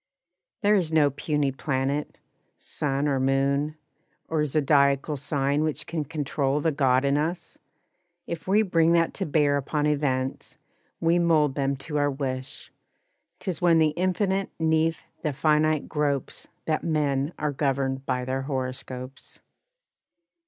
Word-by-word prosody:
There 205 +1 +4
is 180 -6 +1
no 150 -3 +4
puny 145 0 -1
planet, 135 +2 -2 0.4
sun 140 0 -2
or 135 -2 +1
moon, 140 +3 +1 0.5
Or 160 -2 +1
zodiacal 140 0 +2
sign 140 +1 0
which 155 -2 -1
can 160 -3 -3
control 145 -1 -1
The 160 +2 +1
God 135 -2 +2
in 140 +1 +2
us! 165 +4 -4 0.7
If 170 +1 -6
we 205 +3 +4
bring 165 -4 +3
that 165 -1 +2
to - - -3
bear 145 -1 +2
Upon 145 +2 -1
events, 135 -3 -1 0.4
we 165 +1 +3
mold 155 -5 +3
them 140 0 0
to 150 -2 -2
our 145 0 +2
wish, 130 -2 -5 0.7
'Tis 185 -5 -4
when 170 -2 +5
the 160 -1 +4
infinite 185 +3 0
'neath 160 0 +1 0.2
the 150 -3 -1
finite 155 +1 +2
gropes 145 -3 -2 0.2
That 155 -1 0
men 145 -2 0
are 150 -1 -1
governed 135 -1 -1
by 125 0 -1
their 130 +1 -2
horoscopes. 130 -1 -6
145 Hz, 140 wpm, -26 LUFS, 135-160 Hz, 0.7 s, when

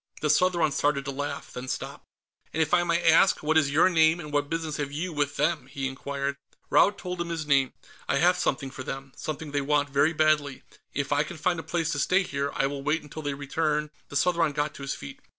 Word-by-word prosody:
The 150 - +3
Southron 170 -2 +3
started 140 0 0
to 140 - -3
laugh, 140 +1 -5
then 125 +1 -6
stopped. - - -5 0.5
"And - - -2
if 155 - -4
I 175 - +5
may 170 0 0
ask, 165 +2 +5
what 155 +1 +1
is 155 -3 +4
your 150 +6 +5
name, 160 -1 +4
and 150 -3 -8
what 145 0 +1
business 165 -2 -2
have 145 -1 -3
you 165 +4 -3
with 145 -1 -1
them?" 150 -2 0
he 135 0 -3
inquired. 140 +1 -3 0.3
Raud 205 - +5
told 180 -1 -4
him 170 - -3
his 165 -2 -3
name. 135 -3 +2 0.4
"I - - +2
have 175 +5 +4
something 140 -6 -1
for 130 - -8
them. 135 +1 -6
Something 155 +2 -5
they 145 0 0
want 145 0 +1
very 145 +4 +3
badly. 155 -3 +1 0.3
If 145 0 -3
I 145 0 +3
can 155 +2 -5
find 175 +2 0
a - - -3
place 165 -1 -1
to 145 - -2
stay 185 +7 +3
here, 140 -4 -2
I - - +2
will 140 0 -3
wait 150 +3 0
until 150 +1 -8
they 145 -2 -3
return 150 +1 -1
" - - -36
The - - -9
Southron 165 -1 +2
got 145 +1 -1
to - - -11
his 135 - -3
feet. 70 - -9
150 Hz, 240 wpm, -27 LUFS, 140-165 Hz, 0.5 s, I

